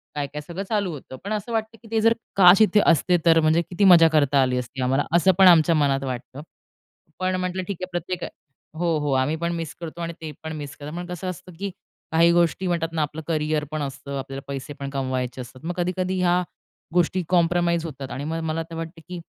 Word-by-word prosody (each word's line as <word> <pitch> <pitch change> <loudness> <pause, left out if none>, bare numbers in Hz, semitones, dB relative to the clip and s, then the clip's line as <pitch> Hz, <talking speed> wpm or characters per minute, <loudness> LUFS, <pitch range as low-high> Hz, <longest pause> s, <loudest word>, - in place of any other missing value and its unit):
काय-काय 145 0 -4
सगळं 170 +6 -6
चालू 205 -4 0
होतं. 135 -2 -9
पण 200 +2 -3
असं 215 +2 -4
वाटतं 225 0 -2
की 230 - -15
ते 225 -1 +2
जर 225 +1 +5 0.2
काश 185 +1 +7
इथे 215 -1 +5
असते 175 +3 +4
तर 165 -1 +6
म्हणजे 160 +2 +3
किती 180 +3 -1
मजा 170 -3 +8
करता 145 -2 +4
आली 125 -1 +1
असती 125 +2 -5
आम्हाला? 135 +3 +1
असं 180 +2 +5
पण 190 -1 +8
आमच्या 165 -1 +6
मनात 140 -2 +1
वाटतं. 130 +1 -6 0.8
पण 185 0 0
म्हटलं 185 0 -2
ठीक 200 - -4
आहे 185 - -3
प्रत्येक 175 +1 -4 0.5
हो, 170 -1 +1
हो. 145 -1 -1
आम्ही 130 +4 +1
पण 170 +1 -2
मिस 165 -3 -4
करतो 170 0 -7
आणि 170 0 -3
ते 160 -1 -5
पण 160 0 -5
मिस 145 0 -7
करतात. 150 +1 -8
पण 175 - -4
कसं 180 +1 -5
असतं 180 0 -8
की 200 0 -2 0.4
काही 165 +1 +5
गोष्टी 175 +2 +2
म्हणतात 170 -2 0
ना 160 - 0
आपलं 150 +1 -3
करिअर 155 -2 0
पण 155 0 -3
असतं, 140 0 -5
आपल्याला 135 0 -6
पैसे 140 +1 -6
पण 140 0 -4
कमवायचे 130 -2 -3
असतात. 130 +3 -12
मग 175 - -2
कधी 175 0 0
कधी 185 0 -1
ह्या 180 0 +3 0.5
गोष्टी 180 +1 +2
कॉम्प्रोमाईज 170 -1 +2
होतात 135 -4 -7
आणि 130 +3 -5
मग 160 +2 -3
मला 160 +1 -2
तर 165 - -8
वाटतं 165 +1 -7
की 180 -1 -5
165 Hz, 225 wpm, -24 LUFS, 145-180 Hz, 0.8 s, मजा